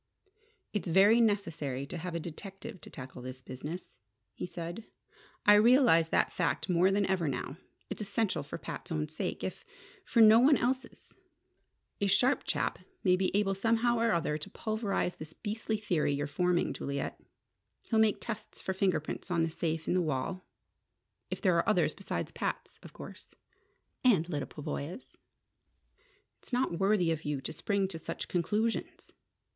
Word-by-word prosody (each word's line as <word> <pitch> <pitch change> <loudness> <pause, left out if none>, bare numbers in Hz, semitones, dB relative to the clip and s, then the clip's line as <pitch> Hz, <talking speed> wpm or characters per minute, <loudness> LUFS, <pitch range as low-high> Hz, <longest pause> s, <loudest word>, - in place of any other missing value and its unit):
"It's 205 -2 -2
very 200 +7 +6
necessary 165 - 0
to 145 - -8
have 175 0 -5
a - - 0
detective 195 +5 -7
to - - -11
tackle 130 -1 -9
this 130 +1 -7
business," 145 +4 -7 0.3
he - - -5
said. 175 +4 -6 0.6
"I 210 - +8
realize 210 - +6
that - - +2
fact 170 - 0
more 180 +1 +4
than 200 +1 +2
ever 185 -4 0
now. 135 +2 -3 0.3
It's - - -6
essential 200 -5 0
for 145 - -6
Pat's - - -7
own 155 -1 -1
sake, 155 - -4
if - - -4 0.4
for 235 - 0
no 220 0 +9
one 275 +3 +6
else's. 255 +2 -2 0.9
A 200 - +1
sharp 250 +7 +3
chap - - -1 0.2
may 180 -2 +5
be 185 0 +1
able 200 -1 +2
somehow 230 +4 +2
or 230 0 +3
other 155 -3 0
to 150 - -7
pulverize 215 -5 -2
this 155 +1 -8
beastly 220 +2 -3
theory 175 -8 0
you're 145 +1 -1
forming, 175 +4 +1
Juliet. 140 0 -4 0.6
He'll 225 - +1
make 220 -2 +4
tests 230 -3 -6
for 190 - -2
fingerprints 185 -3 -1
on 170 -2 +2
the 165 - -1
safe 160 -1 -2
in - - +2
the 185 - +3
wall. 160 +4 -2 0.9
If - - -4
there - - +3
are - - +2
others - - +3
besides - - -4
Pat's, - - -4
of - - -12
course - - -11 0.3
" - - -46
"And 195 -10 +4
Lyda 150 -5 -3
Pavoya's!" 150 - -6 1.2
"It's - - -14
not 245 -9 0
worthy 195 -4 +3
of 160 -1 -2
you 145 -2 -2
to - - -5
spring 200 -2 0
to 165 -4 -4
such 165 +1 -5
conclusions!" 210 +6 -1
185 Hz, 165 wpm, -31 LUFS, 160-215 Hz, 1.2 s, no